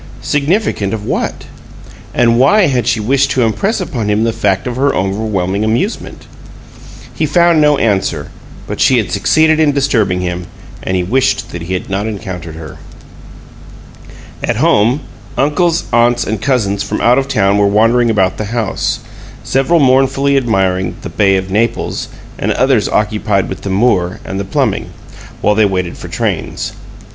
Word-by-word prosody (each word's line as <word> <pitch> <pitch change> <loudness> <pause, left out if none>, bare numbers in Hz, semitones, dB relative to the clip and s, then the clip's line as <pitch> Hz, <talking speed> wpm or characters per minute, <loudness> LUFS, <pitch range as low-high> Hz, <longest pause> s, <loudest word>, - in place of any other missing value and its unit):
Significant 145 - 0
of 105 -1 -7
what? - - -3 0.7
And 115 -1 +2
why 150 +11 +5
had 125 -6 0
she 120 -2 +1
wished 135 +5 +1
to 125 +1 +1
impress 115 - 0
upon 120 - -3
him 105 +1 +1
the 115 0 0
fact 95 -2 0
of 125 - -3
her 140 +2 +1
overwhelming 95 0 -1
amusement? 120 - -2 0.9
He 155 - -1
found 170 +1 +3
no 150 -1 +4
answer, 100 -6 -1 0.3
but - - -5
she 130 -2 +4
had 110 - -1
succeeded 155 +10 +3
in 150 -2 +3
disturbing 115 -10 +1
him, 90 -1 -4 0.3
and 95 - -1
he 90 - 0
wished 125 +9 0
that 85 - -6
he 85 +3 -5
had 90 - -3
not 100 +2 -2
encountered 95 -7 -6
her. 80 -3 -9 1.7
At - - 0
home, 115 +8 +2 0.4
uncles, 165 +4 +1
aunts, 120 0 +3
and 110 -1 -3
cousins 110 -7 0
from - - -3
out 120 +3 +4
of 135 - -3
town 100 -5 +2
were 100 - +4
wandering 115 +4 +3
about 95 -4 +1
the 110 - -3
house, 110 -1 -2 0.4
several 135 +6 +2
mournfully 135 +1 +3
admiring 95 -8 0
the - - -5
"Bay 100 -2 +2
of 95 0 -4
Naples," 110 +3 -1 0.3
and - - 0
others 130 -6 +2
occupied 105 -2 0
with 95 - -6
the 100 - -5
Moor 95 -3 +1
and 95 - -4
the 100 - -3
plumbing, 95 - -1 0.5
while 105 - +3
they 110 0 +3
waited 90 -3 -2
for - - -9
trains. - - -3
110 Hz, 165 wpm, -14 LUFS, 95-135 Hz, 1.7 s, why